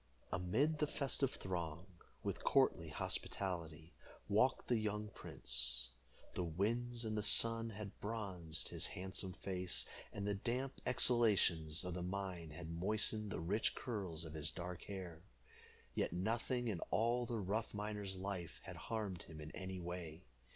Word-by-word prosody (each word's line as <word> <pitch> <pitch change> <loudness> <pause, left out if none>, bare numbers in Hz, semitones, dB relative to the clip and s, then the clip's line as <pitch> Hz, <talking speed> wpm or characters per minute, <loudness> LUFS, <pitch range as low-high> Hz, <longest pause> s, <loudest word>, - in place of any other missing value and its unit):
Amid 115 - +2
the 150 - +3
festive 140 -2 0
throng, 85 -2 -3 0.4
with - - -2
courtly - - +4
hospitality, 85 -4 -2 0.3
walked - - +3
the 120 -2 +3
young 105 0 -1
prince. 60 - +4 0.4
The 90 - -1
winds 115 +8 0
and 110 -1 0
sun 115 +2 +4
had 105 -2 -7
bronzed 95 -7 -1
his - - -1
handsome 95 0 -4
face, 90 -1 0 0.3
and 100 - -4
the 105 - +1
damp 125 +6 -2
exhalations 95 -11 +4
of 90 - -2
the 90 - -3
mine 90 -2 -3
had 80 +1 -7
moistened 105 +4 +1
the 105 - -3
rich 100 +7 +1
curls 95 -9 -3
of 80 - -7
his 80 0 0
dark 90 0 -5
hair. 90 -5 -6 0.7
Yet - - 0
nothing 115 +6 0
in 100 -6 -1
all 120 +2 +2
the 115 - -1
rough 105 +3 -1
miner's 105 -2 -3
life 95 -3 -4
had - - -7
harmed 105 -6 -3
him 80 -1 -10
in 75 0 -7
any 95 0 -5
way. 85 -2 -5
95 Hz, 145 wpm, -39 LUFS, 85-110 Hz, 0.7 s, courtly